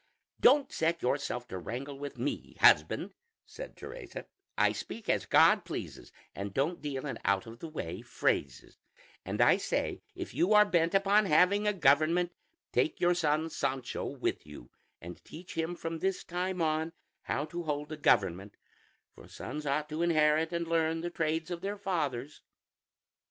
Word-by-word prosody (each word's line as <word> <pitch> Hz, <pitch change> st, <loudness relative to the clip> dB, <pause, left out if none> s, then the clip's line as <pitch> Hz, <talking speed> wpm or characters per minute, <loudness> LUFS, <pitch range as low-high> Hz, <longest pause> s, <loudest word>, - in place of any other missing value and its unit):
"Don't 275 Hz, +2 st, +5 dB
set 165 Hz, +1 st, 0 dB
yourself 125 Hz, -1 st, -1 dB
to 95 Hz, -, -5 dB
wrangle 135 Hz, +8 st, -5 dB
with 145 Hz, 0 st, -6 dB
me, -, -, -4 dB
husband," -, -, +4 dB, 0.3 s
said -, -, -10 dB
Teresa; -, -, -8 dB, 0.3 s
"I -, -, +4 dB
speak 225 Hz, -, -7 dB
as -, -, +1 dB
God -, -, +5 dB
pleases, -, -, -7 dB, 0.2 s
and 100 Hz, +1 st, -6 dB
don't 150 Hz, +4 st, 0 dB
deal 145 Hz, -2 st, -4 dB
in 140 Hz, -, -4 dB
out 100 Hz, +2 st, +1 dB
of 115 Hz, +1 st, -11 dB
the 165 Hz, -, -6 dB
way 90 Hz, -, -5 dB
phrases; 65 Hz, -3 st, -2 dB, 0.4 s
and -, -, -4 dB
I -, -, +6 dB
say -, -, -2 dB
if -, -, -6 dB
you 185 Hz, +5 st, +2 dB
are 210 Hz, 0 st, +8 dB
bent 170 Hz, -2 st, +1 dB
upon 200 Hz, +2 st, +4 dB
having 195 Hz, +6 st, +4 dB
a -, -, +4 dB
government, 165 Hz, +2 st, +3 dB, 0.4 s
take 125 Hz, +6 st, +1 dB
your 175 Hz, 0 st, +4 dB
son 160 Hz, -1 st, 0 dB
Sancho 130 Hz, -4 st, -2 dB
with -, -, -2 dB
you, 75 Hz, -5 st, -12 dB, 0.3 s
and 85 Hz, +1 st, -10 dB
teach 175 Hz, +3 st, -10 dB
him 165 Hz, +2 st, -2 dB
from 165 Hz, -1 st, -5 dB
this 190 Hz, +1 st, -1 dB
time 180 Hz, 0 st, -2 dB
on 160 Hz, +1 st, 0 dB, 0.3 s
how 145 Hz, -, -1 dB
to 175 Hz, +2 st, -5 dB
hold 150 Hz, -1 st, -3 dB
a -, -, -3 dB
government; 100 Hz, -, +2 dB, 0.6 s
for -, -, -15 dB
sons 150 Hz, +2 st, -6 dB
ought 150 Hz, +2 st, 0 dB
to 155 Hz, +2 st, -3 dB
inherit 160 Hz, -1 st, +3 dB
and 170 Hz, -1 st, -2 dB
learn 165 Hz, 0 st, +1 dB
the 175 Hz, +1 st, -4 dB
trades 160 Hz, +1 st, -1 dB
of 170 Hz, -1 st, -4 dB
their 200 Hz, +1 st, -3 dB
fathers." 150 Hz, -9 st, -3 dB
160 Hz, 165 wpm, -31 LUFS, 140-175 Hz, 0.6 s, are